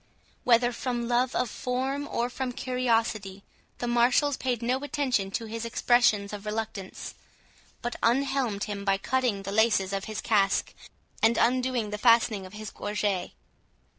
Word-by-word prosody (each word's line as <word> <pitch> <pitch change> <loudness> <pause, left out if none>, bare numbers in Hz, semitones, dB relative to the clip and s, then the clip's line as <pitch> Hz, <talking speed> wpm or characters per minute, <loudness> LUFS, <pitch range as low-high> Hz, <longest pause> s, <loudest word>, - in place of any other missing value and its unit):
Whether 240 0 +4
from 240 -1 -3
love 245 +1 +1
of 250 - +1
form, 260 +5 -2
or 235 - -1
from 250 0 -4
curiosity, 225 -6 -1 0.3
the 240 - -3
marshals 245 +4 +3
paid 245 -3 -2
no 250 +2 +1
attention 275 -8 -1
to 225 +4 -3
his 225 +1 -5
expressions 230 -3 +2
of 210 0 -7
reluctance, 210 -3 -5 0.7
but 240 - -3
unhelmed 250 -4 +1
him 200 -1 -4
by 195 -1 +2
cutting 245 -2 0
the 195 - -5
laces 205 -3 +2
of 195 0 -2
his 215 -2 -5
casque, 200 -3 +1 0.5
and 225 +1 +4
undoing 250 -3 +1
the 210 - -4
fastening 230 -4 +3
of 185 - -16
his 215 -1 -7
gorget. 205 -3 -2
230 Hz, 150 wpm, -27 LUFS, 205-250 Hz, 0.7 s, Whether